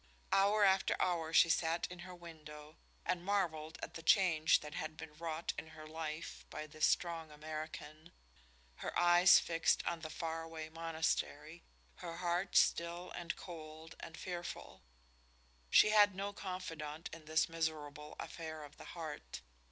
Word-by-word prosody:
Hour 205 +2 +5
after 190 -1 +4
hour 165 -3 +1
she 165 - +7
sat 165 0 +1
in 180 - -8
her 180 +1 -8
window 155 -3 -11 0.3
and 180 -1 0
marveled 170 -6 -1
at - - -5
the 165 - -7
change 165 -3 +5
that 150 0 -8
had 155 0 -4
been 160 -2 -8
wrought 165 0 -3
in - - -8
her 155 - -9
life 155 +1 -5
by 155 - -5
this 155 0 +1
strong 165 -2 0
American, 155 +1 -7 0.7
her - - -3
eyes 175 +1 +8
fixed 165 -1 +2
on 170 -1 -1
the 160 -1 -6
faraway 165 0 -4
monastery, 165 0 -2 0.4
her 165 0 -6
heart 175 +2 -1
still 170 +1 +2
and 170 -1 -4
cold 160 -2 -9
and 160 - -8
fearful. 175 -1 -6 0.9
She 210 - +7
had 205 -2 +6
no 200 +1 -3
confidant 165 -6 -5
in 165 -1 -10
this 155 0 +2
miserable 150 -2 -3
affair 160 -2 -6
of 145 -1 -12
the - - -11
heart. 155 -3 -6
165 Hz, 150 wpm, -36 LUFS, 155-175 Hz, 0.9 s, eyes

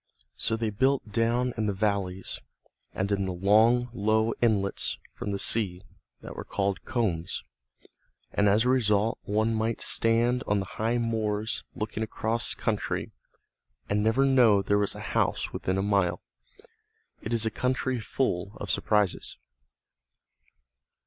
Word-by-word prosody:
So 115 - 0
they 110 -1 -1
built 130 +1 +1
down 120 +3 +1
in 110 -1 0
the 100 - 0
valleys 95 -2 -2 0.5
and 100 +2 -2
in 100 -1 +1
the 95 - -2
long 110 +7 +4
low 110 0 +2
inlets 105 -4 +1 0.2
from - - -5
the 100 - -1
sea 95 -4 0 0.4
that - - -9
were - - -5
called 100 -1 -2
combes, 95 -10 -1 0.9
and 100 0 +3
as 105 +4 +3
a - - +3
result 110 -4 +2
one 110 +2 +1
might 110 +1 -1
stand 120 +2 +2
on 105 - +2
the 95 - -3
high 115 +5 -1
moors 110 -1 -1
looking 110 -2 -4
across 110 +1 -1
country, - - -2 0.8
and 105 0 +1
never 115 +5 +3
know 120 -7 +5
there 105 +1 +2
was 100 - 0
a - - -8
house - - 0
within 95 +1 -1
a 95 - 0
mile. 100 -4 +1 1.0
It 110 - -5
is 115 -1 +1
a 110 - 0
country 130 +1 -1
full 100 -5 -2
of - - -2
surprises. 105 -4 +1
110 Hz, 145 wpm, -28 LUFS, 100-115 Hz, 1.0 s, know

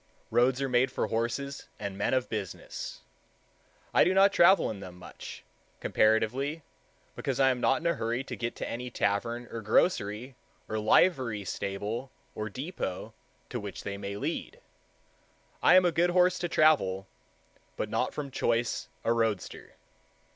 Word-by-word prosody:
Roads 125 +2 +3
are - - 0
made 130 +1 +2
for - - -1
horses 120 +5 -2
and 100 -2 -5
men 100 - 0
of 130 -1 0
business. 105 -5 -6 0.9
I - - +6
do 185 +2 +2
not 195 +1 +6
travel 190 - +5
in 105 - -7
them 90 -2 -9
much, 90 - -10 0.4
comparatively, 125 +8 +1 0.5
because 135 -1 -2
I 135 -1 +5
am 125 -1 -3
not 135 +3 +3
in - - -10
a 170 - +3
hurry 120 0 -2
to - - -6
get 120 0 -3
to - - -4
any 125 +2 -4
tavern 115 +3 -1
or 115 - -5
grocery 110 - +1 0.3
or 110 - -2
livery 110 - +3
stable 105 +8 -3 0.2
or 110 0 -4
depot 130 - -5 0.4
to - - -3
which - - -7
they 100 - -4
lead. 120 - -4 1.0
I - - +6
am 185 -1 +7
a 175 - +4
good 170 +2 +2
horse 180 0 +3
to 175 - -2
travel, 100 - +3 0.7
but - - -1
not - - 0
from 140 -2 -5
choice 120 -1 0
a 115 - +2
roadster. 115 -4 -2
120 Hz, 155 wpm, -29 LUFS, 105-145 Hz, 1.0 s, am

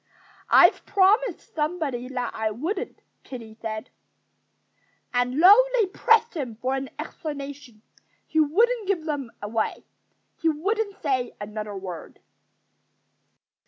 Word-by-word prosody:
"I've - - +6
promised 405 +2 +2
somebody 300 -6 -2
that 250 -2 -3
I 220 0 -1
wouldn't," 320 - -4 0.2
Kiddie 230 -4 -9
said. 220 +1 -5 1.2
And 250 +5 +1
though 410 +7 +9
they 445 - +4
pressed 455 +4 +3
him 255 -8 -4
for 255 +4 -2
an 270 0 -3
explanation, 280 -7 -7 0.4
he 315 - 0
wouldn't 430 +9 +2
give 360 -5 0
them 285 -6 -3
any. 215 +1 -2 0.5
He 330 - +2
wouldn't 400 +6 -1
say 255 -5 -1
another 210 0 -6
word. 180 -4 -8
285 Hz, 115 wpm, -25 LUFS, 240-375 Hz, 1.2 s, though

